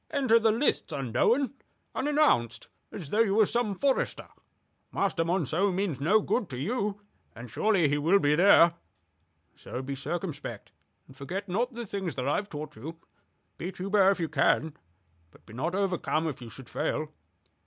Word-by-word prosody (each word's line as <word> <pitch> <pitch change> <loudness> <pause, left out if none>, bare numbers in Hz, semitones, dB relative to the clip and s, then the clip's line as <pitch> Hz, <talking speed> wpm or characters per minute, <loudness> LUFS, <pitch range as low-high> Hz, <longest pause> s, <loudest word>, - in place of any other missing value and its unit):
"Enter 260 -6 +3
the 220 -1 +3
lists 235 - 0
unknown, 155 - +1 0.4
unannounced, 290 - +1 0.2
as 150 - -8
though 215 - +1
you 210 -3 +3
were 215 -1 +5
some 220 -2 -1
forester. 275 +3 0 0.6
Master 190 -4 0
Monceux 175 +2 +1
means 185 -6 -2
no 200 +10 +3
good 220 -1 -1
to 125 - -6
you, 205 - -2 0.4
and 120 0 -10
surely 200 -7 +2
he 145 +1 0
will 165 +7 +4
be 145 -5 +2
there. 170 0 +6 0.8
So 125 - -7
be 140 +1 -4
circumspect; 145 - -5 0.3
and 135 - -17
forget 185 +10 -5
not 230 +7 -1
the 240 0 -5
things 190 -5 -4
that 130 0 -3
I 145 - +2
have 205 0 -4
taught 150 0 -7
you. 160 +8 -8 0.6
Beat 185 +3 -5
Hubert 195 +1 +3
if 195 - +1
you 165 - -1
can, 155 +1 +1 0.5
but - - -22
be 110 - -14
not 160 +10 -2
overcome 180 -5 0
if 140 -5 -5
you 120 - -8
should 125 +2 -12
fail. 155 +2 -2
175 Hz, 170 wpm, -28 LUFS, 145-205 Hz, 0.8 s, there